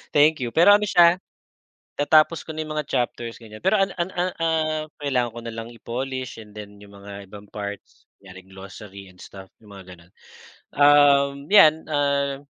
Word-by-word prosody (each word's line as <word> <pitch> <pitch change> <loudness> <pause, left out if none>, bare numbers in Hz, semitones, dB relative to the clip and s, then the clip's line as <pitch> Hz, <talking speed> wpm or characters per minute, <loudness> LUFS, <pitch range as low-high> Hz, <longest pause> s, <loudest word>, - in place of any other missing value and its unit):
Thank 150 +1 +4
you 120 - -3
pero 190 +5 +6
ano 210 - -3
siya. 175 -1 +4 0.8
natapos 155 +3 +2
ko - - -12
na 155 0 -5
yung 155 - -6
mga 150 -2 -5
chapters 120 -2 -3
ganyan, 110 -2 -14
pero 205 +3 +2
an 195 -1 0
an 175 +1 -3 0.3
ah, 155 -1 -1 0.2
kailangan 130 -5 -1
ko 120 - -11
na 115 - -6
lang 115 +1 -8
i-polish, 125 +1 -6
and 105 - -17
then 105 -1 -12
yung 100 - -15
mga 100 -1 -11
ibang 105 0 -12
parts, 100 0 -9
yaring 95 -1 -15
glossary 100 +1 -12
and 90 -1 -17
stamp 95 -1 -12 0.2
yung 105 - -18
mga 90 -1 -13
ganon. 85 0 -21 0.6
Um, 140 -1 +4
yan 160 -6 +6
ah, 140 -1 -1
130 Hz, 175 wpm, -22 LUFS, 105-155 Hz, 0.8 s, pero